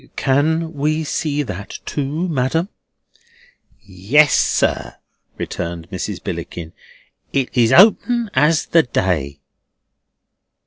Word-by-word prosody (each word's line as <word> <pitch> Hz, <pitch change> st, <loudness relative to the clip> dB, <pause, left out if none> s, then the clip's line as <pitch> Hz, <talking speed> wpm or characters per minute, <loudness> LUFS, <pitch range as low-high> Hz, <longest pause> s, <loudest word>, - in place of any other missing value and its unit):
"Can 160 Hz, +4 st, +1 dB
we 155 Hz, +2 st, -1 dB
see 150 Hz, -1 st, -2 dB
that 100 Hz, -6 st, -7 dB
too, 150 Hz, +5 st, -2 dB
ma'am?" 160 Hz, +4 st, -1 dB, 1.1 s
"Yes, 110 Hz, +9 st, +2 dB
sir," -, -, +1 dB, 0.4 s
returned 85 Hz, 0 st, -5 dB
Mrs. 95 Hz, -, -5 dB
Billickin, 85 Hz, -2 st, -6 dB, 0.6 s
"it 135 Hz, -2 st, -1 dB
is 115 Hz, -2 st, +3 dB
open 225 Hz, +3 st, +4 dB
as 150 Hz, +4 st, +2 dB
the 165 Hz, -, +4 dB
day." 80 Hz, -, -2 dB
140 Hz, 95 wpm, -19 LUFS, 95-160 Hz, 1.1 s, open